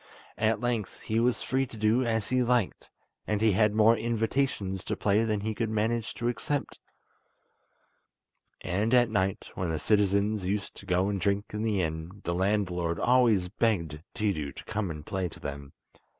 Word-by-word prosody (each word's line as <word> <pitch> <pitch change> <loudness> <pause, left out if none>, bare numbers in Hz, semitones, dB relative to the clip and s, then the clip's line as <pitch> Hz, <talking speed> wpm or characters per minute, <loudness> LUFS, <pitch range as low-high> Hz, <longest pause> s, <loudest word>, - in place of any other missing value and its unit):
At 110 0 +2
length 120 -4 -2
he 110 +1 0
was 120 +1 +1
free 135 0 0
to 115 - -11
do 110 +4 +3
as 115 -3 -1
he 130 0 +2
liked, 120 -4 0 0.4
and 105 -1 0
he 110 0 +4
had 105 +2 +3
more 110 +1 +6
invitations 115 -4 -1
to - - -1
play 105 +2 +2
than 110 -2 0
he 110 +1 -2
could 115 0 -2
manage 110 +1 -1
to 120 - -2
accept, 140 +4 -2 1.8
and 105 +7 +1
at 120 -2 +4
night, 95 -2 -1
when 95 -2 -2
the 80 - -1
citizens 100 +4 +2
used 100 +2 -2
to - - -12
go 90 +1 +2
and 100 -2 -2
drink 100 +3 0
in 105 - -2
the 105 -4 +1
inn, 80 +5 -5
the 85 - -1
landlord 90 -3 0
always 120 -7 +4
begged 90 -7 -1
Tiidu 95 -11 -1
to - - -9
come 110 -3 -2
and 75 -2 -7
play 95 -2 -2
to - - -12
them. 70 0 -6
105 Hz, 180 wpm, -28 LUFS, 95-115 Hz, 1.8 s, more